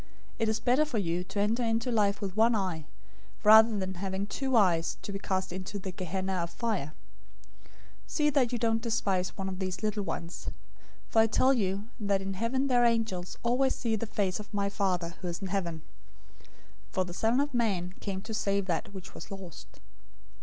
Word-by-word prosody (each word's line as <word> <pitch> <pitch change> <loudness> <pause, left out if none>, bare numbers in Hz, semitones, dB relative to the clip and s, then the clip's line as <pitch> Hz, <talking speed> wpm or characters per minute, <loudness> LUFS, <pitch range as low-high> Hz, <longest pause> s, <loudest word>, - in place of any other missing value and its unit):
It 225 -1 +2
is 220 - 0
better 255 +4 +3
for 295 -6 -2
you 175 -3 0
to 195 +2 -4
enter 215 +4 +2
into 230 +1 0
life 205 -2 +2
with 195 -2 -3
one 225 +2 +4
eye, 180 -7 -2 0.6
rather 220 +1 +8
than 190 -1 -2
having 190 +1 -3
two 265 +4 -1
eyes 175 -6 +3
to - - -5
be 195 - -4
cast 190 -2 -1
into 190 +2 -5
the 190 -1 -5
Gehenna{or, 185 +1 -3
Hell} 170 - 0
of - - -10
fire. 185 -7 -2 0.7
018:010 - - -24 0.4
See 300 -1 +2
that 265 -4 +2
you 245 - 0
don't 225 -1 +1
despise 200 -6 0
one 195 - -3
of 190 -1 -4
these 185 0 -3
little 215 -1 0
ones, 170 -3 -4 0.6
for 225 - +2
I 220 - +4
tell 260 +4 +4
you 200 -3 -1
that 200 -2 +1
in 195 0 -4
heaven 230 +7 0
their 245 -3 +4
angels 225 -7 +1
always 250 +3 +2
see 230 -3 0
the 220 +1 -3
face 195 -3 -1
of 210 0 -9
my 200 -1 0
Father 180 -4 0
who 185 - -3
is 170 -1 -3
in 195 -2 -4
heaven. 170 -5 -2 0.6
018:011 - - -23 0.5
For 185 -1 +1
the 175 - -7
Son 225 +7 +2
of 285 0 0
Man 195 -7 0
came 190 -1 -4
to 220 - -6
save 200 -3 0
that 180 +2 -2
which 190 0 -9
was - - -9
lost. 190 -5 -10
200 Hz, 205 wpm, -30 LUFS, 185-225 Hz, 0.7 s, rather